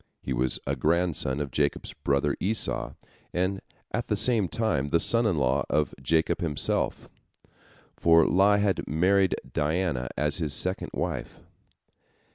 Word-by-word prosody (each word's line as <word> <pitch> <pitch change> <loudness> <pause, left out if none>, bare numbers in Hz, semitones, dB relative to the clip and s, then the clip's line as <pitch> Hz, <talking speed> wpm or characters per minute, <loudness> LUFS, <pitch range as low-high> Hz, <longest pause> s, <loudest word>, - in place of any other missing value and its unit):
He 65 - -4
was 65 +1 +2
a 70 - -1
grandson 75 -2 0
of 70 -2 -4
Jacob's 75 +2 -1
brother 70 0 0
Esau, 70 - -2 0.4
and 95 +2 -1 0.3
at 120 +1 -2
the 105 - 0
same 110 -2 +2
time 85 -11 -1
the 85 +3 +2
son 115 +4 +4
in 100 - +1
law 65 0 +1
of 75 -2 0
Jacob 80 +6 +1
himself, 75 -5 -1 0.9
for 85 -1 +5
lie 100 +2 +4
had 100 -2 0
married 95 +5 +2 0.2
Dinah 75 -4 -1
as 75 +2 0
his 75 -4 0
second 95 +1 -1
wife. - - -4
80 Hz, 140 wpm, -27 LUFS, 70-95 Hz, 0.9 s, for